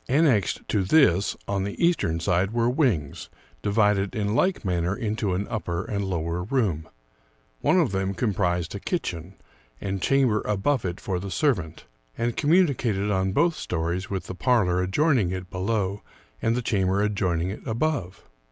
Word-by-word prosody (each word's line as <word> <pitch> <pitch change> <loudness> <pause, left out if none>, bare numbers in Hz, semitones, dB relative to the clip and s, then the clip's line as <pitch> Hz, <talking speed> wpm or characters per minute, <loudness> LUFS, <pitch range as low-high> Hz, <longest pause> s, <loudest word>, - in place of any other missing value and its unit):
Annexed 130 - +2
to 100 - +1
this, 100 - +3
on 100 -1 -1
the 100 +1 -5
eastern 170 - +2
side, 90 +2 +1
were 120 0 +2
wings, 110 - 0 0.3
divided 105 -2 +1
in 105 -1 -1
like 185 - +1
manner 90 +1 0
into 110 -5 -1
an 100 +3 -2
upper 90 -5 -3
and 100 -1 -2
lower 85 -2 -2
room; 90 - -1 0.7
one 185 - +3
of 155 - +2
them 95 0 -1
comprised 90 -5 0
a 100 - -5
kitchen, 95 - -4 0.4
and 95 -1 -3
chamber 130 -5 +2
above 105 +5 0
it 90 0 -3
for 95 -3 -2
the 100 +2 -6
servant, 90 - -1 0.3
and 120 0 -1
communicated 135 - +2
on 95 -1 +1
both 165 - +3
stories 90 - -3
with 95 -3 -3
the - - -6
parlor 95 -4 +2
adjoining 120 - +2
it 90 0 -5
below 100 +1 -1 0.4
and 115 +1 +1
the 125 - -2
chamber 100 -2 +1
adjoining 95 -4 0
it 105 - -7
above. 115 - -2
100 Hz, 160 wpm, -25 LUFS, 90-120 Hz, 0.7 s, this